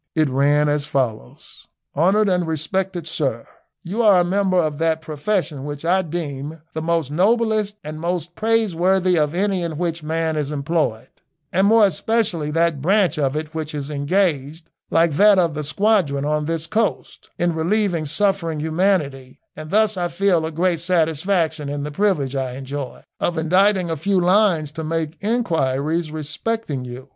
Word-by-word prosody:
It 155 -3 +2
ran 145 +3 +2
as 145 -1 0
follows: 125 - -4 0.3
"Honoured 195 +8 +3
and 180 -3 +1
respected 175 +3 -2
Sir, 135 -8 -2 0.4
You 195 +7 -2
are 205 -5 +6
a - - +4
member 190 0 +1
of 155 -4 0
that 160 -1 +1
profession 155 -1 -2
which 145 +1 -6
I 185 +3 +3
deem 155 -3 -5
the 160 - -3 0.3
noblest 215 +3 +1
and 155 +1 -7
most 175 0 -3
praiseworthy 190 -4 +1
of 150 +1 0
any 195 0 0
in 165 -3 -4
which 170 -1 -2
man 160 +1 -1
is 145 -2 -2
employed, 145 -6 -1 0.4
and 190 +3 +3
more 220 0 +6
especially 195 -3 0
that 165 -2 +1
branch 185 -2 +2
of 135 -1 0
it 155 +1 -4
which 155 -1 -4
is 145 0 -5
engaged, 150 0 -1 0.2
like 165 0 +3
that 205 +1 +6
of 170 -4 +2
the 150 0 -4
squadron 155 -4 +1
on 150 0 0
this 165 0 -2
coast, 215 +4 -2
in 175 0 +1
relieving 170 -1 0
suffering 180 -3 0
humanity, 155 -5 -1 0.2
and 155 0 -8
thus 215 +1 +2
I 175 -1 0
feel 175 -2 +1
a - - -5
great 170 +1 0
satisfaction 160 -2 0
in 145 0 -3
the 150 - -4
privilege 150 -7 0
I 130 -2 -2
enjoy 135 0 -6 0.2
of 175 - -1
inditing 185 +2 +2
a - - 0
few 195 +5 +1
lines 180 -4 +2
to 160 +1 -6
make 160 0 -3
inquiries 165 - 0
respecting 155 - -3
you. 125 +2 -9
165 Hz, 165 wpm, -21 LUFS, 150-190 Hz, 0.4 s, are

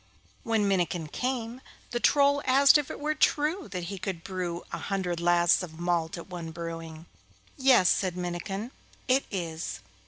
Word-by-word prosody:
When 220 -3 +1
Minnikin 175 -4 0
came, 245 - -3 0.3
the 240 - -1
Troll 285 +2 +4
asked 275 +3 +6
if 290 - -4
it - - -6
were 305 +1 0
true 305 +4 +1
that 180 -3 -5
he 190 +2 -5
could 175 -3 -4
brew 180 -2 -4
a - - -3
hundred 185 -4 -2
lasts 175 0 +4
of 165 -3 -8
malt 170 -1 0
at 170 - -8
one 175 -3 -6
brewing. 165 -1 -7 0.5
'Yes,' 260 -9 +5
said 185 -2 +1
Minnikin, 180 +6 -4 0.4
'it 260 +2 +3
is. 170 -4 -4
185 Hz, 160 wpm, -28 LUFS, 170-255 Hz, 0.5 s, asked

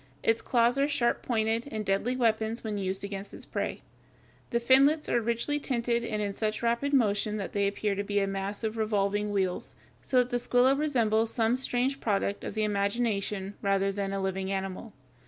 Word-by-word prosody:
Its 225 0 +2
claws 240 +2 +2
are 280 - +3
sharp 255 -5 +1
pointed, 225 +1 0
and 215 -1 -3
deadly 200 +6 0
weapons 225 -2 0
when 215 -2 -3
used 190 0 -2
against 200 0 -6
its - - -9
prey. - - -3 0.7
The 235 - +1
finlets 275 +6 +4
are 240 - +2
richly 235 +6 0
tinted 235 -3 0
and 215 -2 -2
in 200 -1 -2
such 215 +2 -2
rapid 235 +5 +1
motion 215 -5 +2
that 195 - -5
they 200 -1 +2
appear 205 +1 -1
to 200 +1 -2
be 205 0 0
a 195 - +2
mass 195 +2 -4
of 220 0 -2
revolving 210 -1 0
wheels, 190 -3 -2 0.3
so 260 - 0
that 250 0 +3
the 245 - +2
Squilla 245 +2 +4
resembles 230 -7 +1
some 225 0 +2
strange 260 +1 0
product 200 -3 -1
of - - -5
the 215 - 0
imagination 200 -1 -1
rather 195 0 +1
than 195 0 -3
a 195 - -2
living 190 0 -2
animal. 195 +3 -4
220 Hz, 190 wpm, -29 LUFS, 200-240 Hz, 0.7 s, finlets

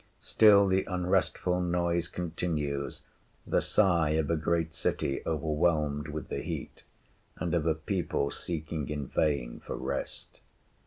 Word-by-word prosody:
Still 100 -2 +6
the 95 0 +2
unrestful 90 -1 +1
noise 85 -1 0
continues, 80 -5 -3 0.4
the - - +2
sigh 85 -7 +3
of 80 -1 +1
a - - +3
great 80 0 0
city 70 - -1
overwhelmed 75 -1 +1
with 75 0 -5
the - - -3
heat, - - -6 0.6
and 90 -1 -2
of 85 -2 +1
a 80 - +3
people 80 -3 -1
seeking 80 -3 -4
in 75 -2 -3
vain 70 -5 0
for - - -6
rest. - - -5
80 Hz, 130 wpm, -30 LUFS, 75-90 Hz, 0.6 s, Still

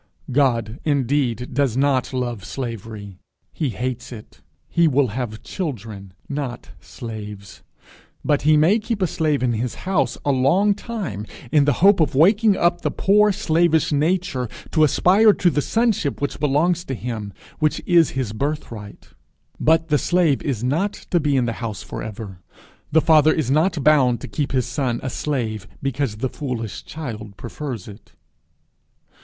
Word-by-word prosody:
God 120 -3 +1
indeed 130 -4 0
does 130 -3 +1
not 135 -1 +1
love 120 -5 -3
slavery; 105 -2 -7 0.3
he 150 - -1
hates 125 +1 -4
it; 110 -3 -12 0.3
he 170 -1 +3
will 140 -3 +2
have 110 -1 -5
children, 110 - -6
not 140 -4 -5
slaves; 105 - -9 0.6
but 145 -1 +2
he 155 +1 +4
may 175 +9 +4
keep 225 0 -3
a - - +4
slave 155 -5 0
in 125 - +2
his 115 +2 -2
house 185 -6 0
a 145 - +3
long 170 +11 +3
time 195 - -5 0.2
in 145 -2 +4
the 145 - +3
hope 200 -1 +6
of 155 -3 +1
waking 200 +7 +4
up 175 0 +2
the - - 0
poor 210 +2 +3
slavish 170 -5 +2
nature 150 - 0 0.2
to 155 - +3
aspire 195 +8 +5
to 175 -3 +2
the 145 - +1
sonship 220 - 0
which 145 - -3
belongs 155 +4 +1
to 135 - -3
him, 110 -4 -5 0.3
which 155 -1 +1
is 170 -3 +5
his 120 -6 -2
birthright. 115 -5 -5 0.5
But 160 +1 +3
the 150 -1 +3
slave 175 -6 +2
is 125 -6 -2
not 165 +11 0 0.2
to 175 - +3
be 145 -3 +1
in 125 - +2
the 115 - -1
house 110 -3 -4
for - - -7
ever. 100 -4 -8 0.5
The 160 - +5
father 155 -1 +5
is 140 -6 -1
not 155 +1 +2
bound 130 -5 +4
to - - -6
keep 145 -2 -3
his 130 -4 +1
son 125 -2 -2
a 130 - -3
slave 110 -11 -3
because 135 -4 -2
the 125 +4 -2
foolish 120 -8 -5
child 110 -10 -7
prefers 125 - -6
it. 105 +1 -13
140 Hz, 160 wpm, -22 LUFS, 115-160 Hz, 0.6 s, hope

